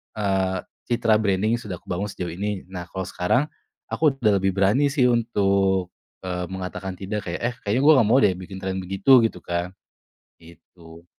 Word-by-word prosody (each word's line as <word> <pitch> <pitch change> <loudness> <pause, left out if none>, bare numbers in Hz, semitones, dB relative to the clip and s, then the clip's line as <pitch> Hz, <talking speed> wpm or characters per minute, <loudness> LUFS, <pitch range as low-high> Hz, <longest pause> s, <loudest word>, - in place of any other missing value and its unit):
eee, 95 -3 0 0.3
citra 115 -2 +2
branding 105 +3 +1
yang - - -11
sudah 100 -4 -5
kubangun 95 +3 -3
sejauh 90 -4 -5
ini. 100 +2 -3
Nah 90 -2 -6
kalau 95 - -5
sekarang 125 +12 0 0.4
aku 150 -4 +2
udah 110 -7 +2
lebih 95 0 0
berani 100 +9 +3
sih 125 -5 +3
untuk, 100 -5 +1 0.3
eee, 90 -1 -3
mengatakan 95 0 -5
tidak 100 +2 -5
kayak, 85 - -4
"Eh - - -21
kayaknya 110 +6 +1
gue 155 - +8
nggak 115 -4 +4
mau 120 - +5
deh 95 - +4
bikin 95 +1 -9
tren 95 0 -3
begitu," 95 +8 +4
gitu 115 - -3
kan. 85 +1 -3 0.7
Gitu. 85 0 -16
95 Hz, 175 wpm, -23 LUFS, 90-110 Hz, 0.7 s, gue